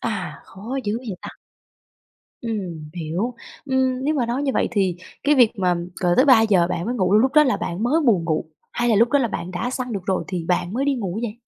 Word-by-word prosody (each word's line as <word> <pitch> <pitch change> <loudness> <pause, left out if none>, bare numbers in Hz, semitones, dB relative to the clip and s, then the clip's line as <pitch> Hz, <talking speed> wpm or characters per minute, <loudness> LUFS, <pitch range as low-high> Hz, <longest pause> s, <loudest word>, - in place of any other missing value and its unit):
À, - - -4
khó 230 +8 -6
dữ 210 +2 -1
vậy 235 -6 -6
ta! - - -6 1.1
Ừm, 185 -9 -5
hiểu. 175 +8 -3 0.3
Ừm, 260 -1 0
nếu 300 - +1
mà 265 -6 0
nói 245 +5 -2
như 275 - +1
vậy - - +1
thì 195 -5 +1 0.3
cái 295 +1 +4
việc 245 -5 +5
mà 180 -1 +2 0.3
cờ 175 -1 +3
tới 260 - +5
3:00 220 -9 +5
bạn 170 -1 -2
mới 245 +3 -2
ngủ, 190 -4 +1
lúc 240 +5 +4
đó 300 0 +7
là 260 - +1
bạn 180 +6 -4
mới 300 +7 +2
buồn 195 -8 +3
ngủ, 160 -1 -1 0.3
hay 240 0 0
là 225 - +4
lúc 230 +3 +4
đó 285 - +3
là 245 - +1
bạn 180 -3 -5
đã 185 +7 -2
săn 250 -2 -4
được 190 -3 -5
rồi 190 - 0
thì 180 -3 -4
bạn 180 +1 0
mới 265 +4 0
đi 285 -1 +2
ngủ 200 -4 -3
vậy? 235 -1 -4
225 Hz, 240 wpm, -22 LUFS, 185-255 Hz, 1.1 s, đó